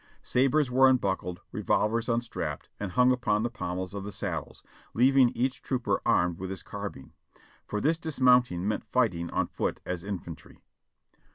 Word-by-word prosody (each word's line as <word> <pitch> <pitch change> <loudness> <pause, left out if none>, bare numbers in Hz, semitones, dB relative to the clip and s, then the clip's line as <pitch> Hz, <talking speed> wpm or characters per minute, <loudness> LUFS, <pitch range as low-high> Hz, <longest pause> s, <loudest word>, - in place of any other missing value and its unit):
Sabres 135 +2 +2
were 130 +1 +6
unbuckled, 95 -8 0
revolvers 115 +2 0
unstrapped 120 0 -3
and 100 -3 -4
hung 125 0 +5
upon 110 -4 +1
the 120 - -1
pommels 95 -6 -4
of 100 -1 -5
the 105 - -6
saddles, - - -5 0.3
leaving 130 +1 +5
each 130 +2 -1
trooper 130 -3 -1
armed 85 -1 +2
with 95 0 -5
his 95 -1 -6
carbine; 100 -9 -7 0.5
for 105 - -2
this 160 +8 +1
dismounting 125 - +3
meant 105 - -1
fighting 95 -10 +1
on - - 0
foot - - -3
as 90 -2 -4
infantry. 95 -4 -8
115 Hz, 155 wpm, -28 LUFS, 95-125 Hz, 0.5 s, were